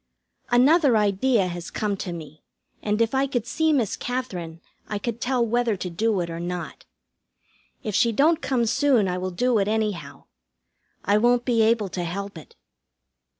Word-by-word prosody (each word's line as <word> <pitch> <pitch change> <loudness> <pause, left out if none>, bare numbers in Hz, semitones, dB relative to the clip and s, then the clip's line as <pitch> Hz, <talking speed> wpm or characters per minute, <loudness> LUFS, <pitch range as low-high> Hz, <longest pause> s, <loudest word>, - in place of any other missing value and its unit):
Another 265 +1 +5
idea 210 +1 +2
has 175 -1 -6
come 210 -2 -2
to 185 - -5
me, 155 -3 -9 0.4
and 210 +2 +1
if 230 - -3
I 270 +1 +2
could 245 -4 -2
see 320 +6 +1
Miss 245 -9 +1
Katherine 180 -10 -5 0.3
I 210 - -3
could 230 +2 -4
tell 250 -2 +1
whether 235 -2 0
to 180 -1 -5
do 210 +2 0
it 170 - -4
or 165 - -5
not. 175 0 -5 1.0
If 215 -4 -3
she 235 +4 +3
don't 310 +8 +3
come 245 -3 0
soon 260 -3 +2
I 180 0 -2
will 185 +1 -2
do 235 +5 +1
it, 195 - +1
anyhow. 205 -10 -2 0.8
I 205 +1 +3
won't 240 +1 +3
be 235 -3 +2
able 220 -2 +2
to 180 -1 -4
help 200 +3 -5
it. 160 - -13
215 Hz, 175 wpm, -24 LUFS, 185-245 Hz, 1.0 s, Another